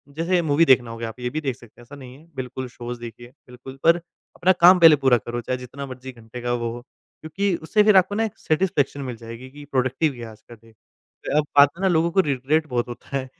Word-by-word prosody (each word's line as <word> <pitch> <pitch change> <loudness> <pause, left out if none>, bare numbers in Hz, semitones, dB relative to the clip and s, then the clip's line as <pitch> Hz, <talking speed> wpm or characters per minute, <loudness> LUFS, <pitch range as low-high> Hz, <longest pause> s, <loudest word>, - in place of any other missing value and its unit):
जैसे 175 +3 +1
मूवी 160 0 +2
देखना 125 -5 +3
हो 115 - -8
गया, 115 0 -5
आप 110 - -12
ये 125 0 -3
भी 155 +4 -4
देख 135 -4 -3
सकते 120 -1 -18
हैं - - -14
ऐसा 140 +4 -13
नहीं 130 -2 -12
है 155 - -19
बिल्कुल 130 0 -6
शोज़ 120 0 -8
देखिए 120 0 -10 0.2
बिल्कुल 125 +2 -12
पर 170 +1 +5
अपना 175 +1 -3
काम 180 +1 +8
पहले 165 -2 +8
पूरा 130 -2 +5
करो 120 +1 -6
चाहे 125 +2 -3
जितना 130 +3 -8
मर्ज़ी 130 0 -9
घंटे 115 0 -11
का 120 0 -2
वो 120 -1 -2
हो। 120 - -8
क्योंकि 175 +8 -5
उससे 210 +6 +2
फिर 210 -2 +5
आपको 185 +2 +2
ना 225 - +1
एक 220 - -7
सैटिस्फैक्शन 155 -4 0
मिल 125 -3 -5
जाएगी 115 +3 -10
कि 145 +1 -12
प्रोडक्टिव 135 +3 0
गया 120 -3 -9
आज 110 0 -17
का 120 - -11
दिन। 115 0 -22 0.6
अब 150 - +2
बात 140 0 +8
है - - -9
ना 190 - +3
लोगों 170 0 +1
को 195 - +1
रिग्रेट 145 +1 -1
बहुत 120 -3 -2
होता 130 +3 -6
है 130 -1 -6
130 Hz, 250 wpm, -22 LUFS, 120-160 Hz, 0.6 s, काम